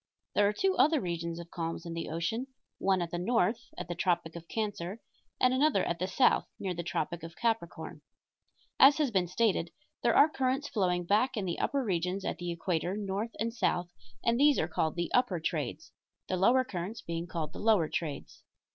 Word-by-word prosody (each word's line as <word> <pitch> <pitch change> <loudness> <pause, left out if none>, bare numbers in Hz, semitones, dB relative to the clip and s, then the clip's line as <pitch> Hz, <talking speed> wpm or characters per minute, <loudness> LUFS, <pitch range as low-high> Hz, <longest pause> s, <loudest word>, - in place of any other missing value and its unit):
There 205 - +4
are - - +2
two 380 - +1
other 310 +1 +5
regions 170 -3 -3
of 170 0 -10
calms 165 0 -4
in 170 - -5
the 165 0 -4
ocean, 225 +11 -2 0.3
one 190 -2 +2
at 170 - -6
the 175 - -2
north 230 +3 +1
at - - -5
the 175 - -3
tropic 175 -2 0
of 170 0 -9
Cancer 205 -2 -3 0.4
and 255 0 +4
another 270 -6 +3
at 170 - -2
the 185 - -1
south 245 +7 +3
near 190 -2 -3
the 170 - -4
tropic 170 0 -3
of 165 +1 -9
Capricorn. 225 -7 -2 0.8
As 275 +2 +8
has 295 -5 +1
been 185 -4 +1
stated, 190 -3 +1 0.3
there - - +3
are 290 - +8
currents 270 0 -1
flowing 180 -6 0
back 220 +8 +2
in 200 - -1
the 175 - -2
upper 280 -1 0
regions 185 -1 -1
at - - -3
the 175 0 -3
equator 175 +2 -1
north 205 +2 -3
and 230 +1 -1
south, 180 -6 0 0.3
and 235 +1 +2
these 290 0 +5
are 160 - +1
called 160 -2 -1
the 175 -1 -2
upper 245 -8 +2
trades 160 - -3 0.4
the 185 - 0
lower 235 +8 +4
currents 200 -1 -5
being 170 +1 -4
called 160 -2 -4
the - - -8
lower 210 -7 +3
trades. 155 -2 -5
185 Hz, 200 wpm, -31 LUFS, 170-230 Hz, 0.8 s, As